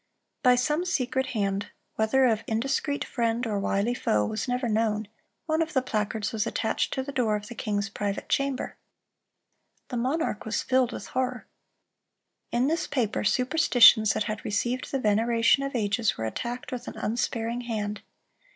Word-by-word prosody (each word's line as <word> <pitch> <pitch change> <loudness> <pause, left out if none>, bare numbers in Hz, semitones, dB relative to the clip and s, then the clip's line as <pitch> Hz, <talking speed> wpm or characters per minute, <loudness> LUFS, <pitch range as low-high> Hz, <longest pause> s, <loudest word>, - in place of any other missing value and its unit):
By 250 -1 +6
some 300 +7 +1
secret 260 -6 0
hand—whether 220 +3 0
of 225 -3 +2
indiscreet 275 +5 -1
friend 235 0 -1
or 210 -3 -1
wily 200 +4 0
foe 105 - +1
was 215 - -3
never 250 0 -1
known—one 220 +8 -2
of 320 - -2
the 260 - +3
placards 215 -2 -2
was 220 0 -1
attached 220 - -1
to 265 - -1
the 280 - -6
door 235 -5 +1
of 210 0 -4
the - - -6
king's 205 -3 -2
private 200 0 -3
chamber. 275 -1 -1 1.1
The 245 - -3
monarch 260 +1 -1
was 220 - -2
filled 255 -1 +2
with - - -6
horror. 255 -1 -2 1.1
In 240 +2 +2
this 320 +4 0
paper, 240 -7 -1
superstitions 245 -3 +5
that - - 0
had 215 0 -4
received 240 +4 -1
the 275 - +1
veneration 230 +2 +3
of 275 -1 -3
ages 215 0 +1
were 110 - -3
attacked 240 - -4
with 250 -1 -5
an - - -7
unsparing 230 +1 -2
hand. 210 -3 -3
235 Hz, 160 wpm, -27 LUFS, 215-260 Hz, 1.1 s, By